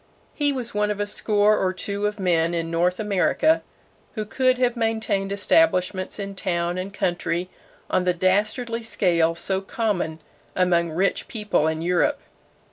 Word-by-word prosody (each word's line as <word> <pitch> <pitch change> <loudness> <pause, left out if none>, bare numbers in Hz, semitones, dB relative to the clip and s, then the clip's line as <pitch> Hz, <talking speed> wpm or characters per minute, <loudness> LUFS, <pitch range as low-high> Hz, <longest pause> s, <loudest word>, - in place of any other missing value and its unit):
He 290 -1 +2
was 250 -4 -4
one 210 0 +1
of 205 -1 -2
a 205 - 0
score 210 0 +2
or 185 - +2
two 200 +2 -2
of 210 0 -5
men 170 -2 +1
in 165 0 -2
North 175 +2 +1
America 215 - +2 0.5
who 215 -2 -3
could 255 +3 +1
have 250 -1 +1
maintained 220 -4 -1
establishments 200 - +1
in 200 -1 -5
town 175 -1 -1
and 190 +2 -5
country 175 -1 -2 0.4
on 185 - +1
the 180 0 +2
dastardly 215 +6 0
scale 170 -7 +1
so 190 +3 -1
common 195 -6 -2 0.4
among 175 -2 +2
rich 185 +5 0
people 210 -8 0
in 160 0 -2
Europe. 180 - +1
195 Hz, 155 wpm, -23 LUFS, 180-215 Hz, 0.5 s, He